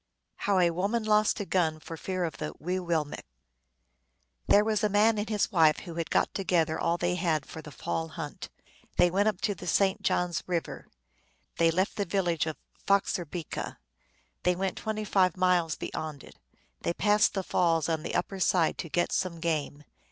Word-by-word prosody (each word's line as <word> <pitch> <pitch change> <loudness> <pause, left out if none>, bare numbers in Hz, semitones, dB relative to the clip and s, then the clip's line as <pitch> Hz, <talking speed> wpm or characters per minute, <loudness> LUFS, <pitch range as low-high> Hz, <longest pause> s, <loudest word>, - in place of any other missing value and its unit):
How 200 -1 +1
a 175 -2 +4
Woman 200 +7 -1
Lost 215 0 +3
a 205 - -2
Gun 165 -5 +1
for 165 - -8
Fear 185 +2 -3
of 165 - -3
tho 150 - -5
Wee 180 +3 -2
willmekq. 165 -5 -2 1.3
THERE 205 - +6
was 215 0 0
a 210 - +3
man 210 +2 +3
and 210 - -3
his 210 -1 0
wife 160 -5 +4
who 170 - -8
had 165 0 -3
got - - +1
to 195 - -3
gether 165 -4 +1
all 170 +1 +1
they 175 +1 0
had 165 -5 0
for 160 - -9
the 155 - -10
fall 160 +4 -3
hunt. 155 -2 -7 0.5
They 175 0 +5
went 200 +3 +2
up 210 -4 0
the 190 -4 -2
St. 190 +3 +2
John 180 0 +1
s 170 - -2
River; 175 -2 -3 0.7
they 165 0 +4
left 185 +5 0
the 200 - 0
village 175 -3 0
of 155 - -4 0.3
Foxer 195 -3 +2
bica; 165 0 -5 0.6
they 180 - +2
went 190 +1 -2
twenty 215 -1 -3
five 185 -3 +2
miles 180 -3 +2
beyond 150 -4 -5
it. - - -14 0.5
They 170 - -1
passed 210 +1 +3
the 195 - -1
falls 165 -3 +1
on 160 -2 0
the - - -4
upper 190 +2 -1
side 175 -3 +2
to 165 - -4
get 175 +3 0
some 180 -3 -1
game. 155 -3 -2
180 Hz, 195 wpm, -29 LUFS, 165-195 Hz, 1.3 s, THERE